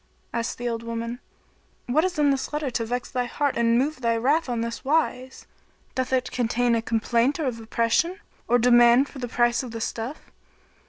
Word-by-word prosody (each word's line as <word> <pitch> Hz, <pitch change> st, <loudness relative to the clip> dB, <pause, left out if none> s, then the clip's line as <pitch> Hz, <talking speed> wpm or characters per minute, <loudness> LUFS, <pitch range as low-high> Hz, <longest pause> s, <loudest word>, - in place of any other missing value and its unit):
Asked 230 Hz, -1 st, -2 dB
the 245 Hz, -, -4 dB
old 230 Hz, -1 st, -2 dB
woman, 230 Hz, +1 st, -4 dB, 0.7 s
"What 290 Hz, +6 st, +2 dB
is 365 Hz, -2 st, -1 dB
in 290 Hz, -2 st, +4 dB
this 270 Hz, -1 st, -2 dB
letter 295 Hz, -3 st, -2 dB
to 230 Hz, -1 st, -1 dB
vex 245 Hz, +1 st, -3 dB
thy 250 Hz, -1 st, -1 dB
heart 285 Hz, +3 st, -1 dB
and 235 Hz, 0 st, +3 dB
move 275 Hz, +2 st, -1 dB
thy 230 Hz, -1 st, +1 dB
wrath 280 Hz, +6 st, +1 dB
on 235 Hz, -2 st, -1 dB
this 230 Hz, 0 st, -4 dB
wise? 265 Hz, -3 st, -1 dB, 0.5 s
Doth 260 Hz, 0 st, -2 dB
it 255 Hz, -1 st, 0 dB
contain 240 Hz, 0 st, +1 dB
a 230 Hz, -, +2 dB
complaint 235 Hz, +4 st, +1 dB
of 260 Hz, -8 st, -2 dB
oppression 230 Hz, -, 0 dB, 0.3 s
or 245 Hz, -, +4 dB
demand 240 Hz, +2 st, +5 dB
for 275 Hz, -, -10 dB
the 245 Hz, -, -3 dB
price 240 Hz, 0 st, +2 dB
of 255 Hz, -, -7 dB
the 230 Hz, 0 st, -6 dB
stuff?" 230 Hz, +5 st, -5 dB
245 Hz, 195 wpm, -25 LUFS, 230-270 Hz, 0.7 s, demand